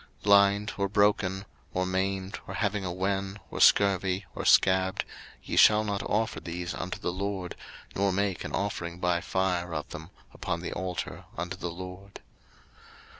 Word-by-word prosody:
03:022:022 -, -, -25 dB
Blind, 100 Hz, 0 st, +5 dB
or 100 Hz, 0 st, +1 dB
broken, 100 Hz, -2 st, +2 dB, 0.3 s
or 90 Hz, 0 st, +1 dB
maimed, 95 Hz, +1 st, -2 dB
or -, -, -5 dB
having 105 Hz, -2 st, 0 dB
a 90 Hz, -, -2 dB
wen, 95 Hz, +2 st, -2 dB
or -, -, -5 dB
scurvy, 95 Hz, -1 st, +4 dB
or -, -, -5 dB
scabbed, 95 Hz, 0 st, +4 dB, 0.4 s
ye -, -, -4 dB
shall 105 Hz, 0 st, +7 dB
not 100 Hz, -2 st, -2 dB
offer 110 Hz, +2 st, -1 dB
these 85 Hz, 0 st, -5 dB
unto 90 Hz, 0 st, -4 dB
the -, -, -2 dB
LORD, 95 Hz, -1 st, -3 dB, 0.4 s
nor 100 Hz, 0 st, +2 dB
make 100 Hz, 0 st, -1 dB
an -, -, -5 dB
offering 85 Hz, -4 st, -3 dB
by 90 Hz, -1 st, +1 dB
fire 90 Hz, -2 st, -1 dB
of 75 Hz, -, -3 dB
them 80 Hz, +2 st, -8 dB, 0.2 s
upon 85 Hz, 0 st, -3 dB
the -, -, -4 dB
altar 90 Hz, -1 st, -4 dB
unto 90 Hz, +1 st, -3 dB
the 90 Hz, -1 st, -4 dB
LORD. 95 Hz, +3 st, -9 dB
95 Hz, 165 wpm, -28 LUFS, 90-100 Hz, 0.4 s, shall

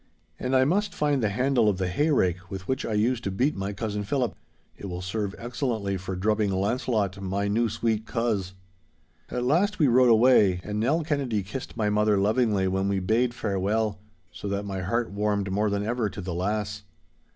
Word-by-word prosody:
And 130 Hz, +1 st, 0 dB
I 130 Hz, 0 st, +5 dB
must 200 Hz, +5 st, 0 dB
find 145 Hz, -3 st, +1 dB
the 110 Hz, -, +2 dB
handle 120 Hz, +1 st, +2 dB
of 100 Hz, -, 0 dB
the 95 Hz, -1 st, -1 dB
hayrake 90 Hz, -, +1 dB
with 95 Hz, -1 st, -7 dB
which 130 Hz, 0 st, -1 dB
I 110 Hz, -, -2 dB
used 115 Hz, +3 st, +1 dB
to -, -, 0 dB
beat 125 Hz, +10 st, 0 dB
my 95 Hz, +1 st, -3 dB
cousin 105 Hz, 0 st, -3 dB
Philip. 125 Hz, +3 st, -1 dB, 0.4 s
It 100 Hz, -, -8 dB
will 90 Hz, 0 st, -5 dB
serve 100 Hz, +1 st, -3 dB
excellently 115 Hz, -4 st, -2 dB
for 95 Hz, 0 st, -5 dB
drubbing 105 Hz, +2 st, +1 dB
Launcelot, 100 Hz, 0 st, 0 dB
my 100 Hz, +1 st, -1 dB
new 115 Hz, +3 st, +1 dB
sweet 110 Hz, 0 st, -1 dB
coz!' 110 Hz, -6 st, -1 dB, 0.8 s
At 125 Hz, -, -2 dB
last 175 Hz, +11 st, +2 dB
we 150 Hz, -, +4 dB
rode 125 Hz, 0 st, +5 dB
away, 110 Hz, -5 st, +5 dB
and 105 Hz, 0 st, -3 dB
Nell 145 Hz, +9 st, +1 dB
Kennedy 135 Hz, -9 st, -1 dB
kissed 115 Hz, +5 st, -7 dB
my 105 Hz, -2 st, +1 dB
mother 105 Hz, 0 st, +3 dB
lovingly 105 Hz, -1 st, +2 dB
when 95 Hz, +1 st, 0 dB
we 100 Hz, -1 st, +1 dB
bade 115 Hz, +6 st, +1 dB
farewell, 100 Hz, +1 st, -1 dB, 0.3 s
so -, -, -7 dB
that 100 Hz, +1 st, -2 dB
my 95 Hz, -1 st, -4 dB
heart 115 Hz, +5 st, -1 dB
warmed 100 Hz, -1 st, -1 dB
more 105 Hz, +2 st, +1 dB
than 100 Hz, 0 st, -1 dB
ever 115 Hz, -1 st, 0 dB
to -, -, -9 dB
the 90 Hz, -2 st, -4 dB
lass. 105 Hz, +3 st, -2 dB
105 Hz, 195 wpm, -26 LUFS, 100-120 Hz, 0.8 s, I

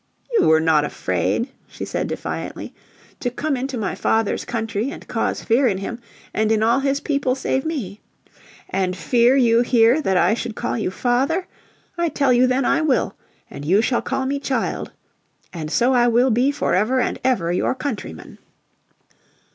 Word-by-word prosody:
"You 465 Hz, -, +4 dB
were 160 Hz, 0 st, +5 dB
not 160 Hz, -2 st, +3 dB
afraid," 90 Hz, -, -1 dB, 0.2 s
she -, -, -7 dB
said -, -, -2 dB
defiantly, -, -, -5 dB, 0.5 s
"to 245 Hz, -, -1 dB
come 285 Hz, +4 st, -2 dB
into 260 Hz, 0 st, -3 dB
my 210 Hz, -4 st, -2 dB
father's 225 Hz, -2 st, 0 dB
country, 225 Hz, 0 st, -2 dB
and 310 Hz, -, -9 dB
cause -, -, -2 dB
fear 250 Hz, +3 st, +3 dB
in 195 Hz, -5 st, 0 dB
him, 215 Hz, +5 st, -5 dB, 0.3 s
and 215 Hz, 0 st, +1 dB
in 220 Hz, -1 st, +2 dB
all 230 Hz, +4 st, +3 dB
his 275 Hz, 0 st, 0 dB
people 280 Hz, -3 st, 0 dB
save 265 Hz, +1 st, -1 dB
me. 225 Hz, -, -4 dB, 0.7 s
And 185 Hz, -1 st, -1 dB
fear 240 Hz, +4 st, +3 dB
you 235 Hz, -3 st, +4 dB
here 240 Hz, +3 st, +4 dB
that 190 Hz, -9 st, +1 dB
I 180 Hz, +4 st, +4 dB
should 230 Hz, -1 st, -4 dB
call 240 Hz, -, -2 dB
you 215 Hz, -, -1 dB
father? 260 Hz, -, 0 dB, 0.5 s
I 340 Hz, -1 st, +1 dB
tell 275 Hz, -4 st, +2 dB
you 250 Hz, +1 st, +4 dB
then 255 Hz, +1 st, +1 dB
I -, -, +2 dB
will. 300 Hz, -5 st, +1 dB, 0.3 s
And 140 Hz, -, -9 dB
you 180 Hz, +7 st, +3 dB
shall 240 Hz, -, +1 dB
call 265 Hz, -, -2 dB
me 280 Hz, +1 st, -1 dB
child. 260 Hz, -4 st, -2 dB, 0.6 s
And 160 Hz, -3 st, -5 dB
so 245 Hz, +10 st, +2 dB
I 240 Hz, -1 st, +4 dB
will 245 Hz, +2 st, +3 dB
be 245 Hz, +5 st, +3 dB
forever 255 Hz, -2 st, +1 dB
and -, -, -1 dB
ever 190 Hz, -10 st, +1 dB
your 180 Hz, -, 0 dB
countryman." 230 Hz, -, -6 dB
240 Hz, 175 wpm, -21 LUFS, 205-265 Hz, 0.7 s, were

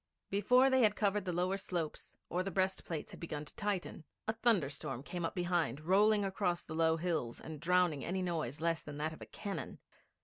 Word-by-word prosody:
Before 250 Hz, +7 st, +5 dB
they 260 Hz, 0 st, +5 dB
had 215 Hz, -2 st, +5 dB
covered 205 Hz, -1 st, +1 dB
the 180 Hz, -, -1 dB
lower 180 Hz, +3 st, +1 dB
slopes 175 Hz, -5 st, -4 dB
or 180 Hz, -, 0 dB
the 190 Hz, -, -2 dB
breastplates 185 Hz, -4 st, -1 dB
had -, -, -10 dB
begun 150 Hz, -3 st, -4 dB
to -, -, -12 dB
tighten, 200 Hz, -6 st, -2 dB, 0.2 s
a 220 Hz, -, +2 dB
thunderstorm 165 Hz, -, 0 dB
came 175 Hz, +3 st, -4 dB
up 165 Hz, -, -2 dB
behind, 175 Hz, -7 st, 0 dB
rolling 205 Hz, +5 st, +4 dB
across 190 Hz, -3 st, 0 dB
the -, -, -8 dB
low 160 Hz, 0 st, +3 dB
hills 155 Hz, -8 st, -1 dB
and 155 Hz, -2 st, -7 dB
drowning 175 Hz, -3 st, +2 dB
any 185 Hz, +2 st, -1 dB
noise 155 Hz, -7 st, -2 dB
less 165 Hz, 0 st, +1 dB
than 145 Hz, -1 st, -8 dB
that 155 Hz, +2 st, -1 dB
of -, -, -13 dB
cannon. 200 Hz, -2 st, -5 dB
175 Hz, 195 wpm, -35 LUFS, 160-195 Hz, 0.2 s, Before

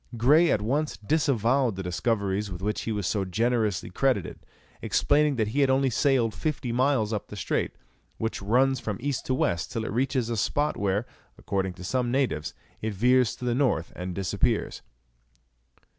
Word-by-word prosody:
Grey 150 Hz, +9 st, +5 dB
at 105 Hz, -, +1 dB
once 145 Hz, +7 st, -1 dB
disavowed 130 Hz, -1 st, +1 dB
the 95 Hz, -, -5 dB
discoveries 100 Hz, +1 st, -1 dB
with 90 Hz, +1 st, -7 dB
which 105 Hz, +1 st, -1 dB
he 115 Hz, -, -3 dB
was 105 Hz, -3 st, -2 dB
so 100 Hz, +2 st, 0 dB
generously 110 Hz, 0 st, 0 dB
credited, 125 Hz, -3 st, 0 dB, 0.4 s
explaining 150 Hz, 0 st, +2 dB
that 110 Hz, -3 st, 0 dB
he 135 Hz, +6 st, -1 dB
had 140 Hz, -2 st, +4 dB
only 135 Hz, 0 st, +2 dB
sailed 120 Hz, -3 st, +2 dB
fifty 140 Hz, -5 st, -3 dB
miles 125 Hz, -3 st, +1 dB
up 105 Hz, -, -3 dB
the -, -, -9 dB
strait, 95 Hz, -, -2 dB, 0.4 s
which 110 Hz, -2 st, -3 dB
runs 130 Hz, +6 st, +2 dB
from 110 Hz, -4 st, -4 dB
east 140 Hz, -1 st, -3 dB
to 130 Hz, -, +1 dB
west 85 Hz, -9 st, -1 dB
till 110 Hz, -1 st, -3 dB
it -, -, -4 dB
reaches 130 Hz, 0 st, 0 dB
a 115 Hz, -1 st, -2 dB
spot 145 Hz, +8 st, 0 dB
where, 100 Hz, +2 st, 0 dB, 0.3 s
according 95 Hz, -2 st, -2 dB
to 90 Hz, -, -11 dB
some 125 Hz, +6 st, 0 dB
natives, 125 Hz, -, -1 dB, 0.3 s
it 110 Hz, -1 st, -3 dB
veers 125 Hz, +3 st, +3 dB
to 125 Hz, -, -7 dB
the 120 Hz, -, +1 dB
north 125 Hz, -, 0 dB
and 90 Hz, 0 st, -5 dB
disappears. 95 Hz, -3 st, -1 dB
115 Hz, 175 wpm, -27 LUFS, 100-130 Hz, 0.4 s, Grey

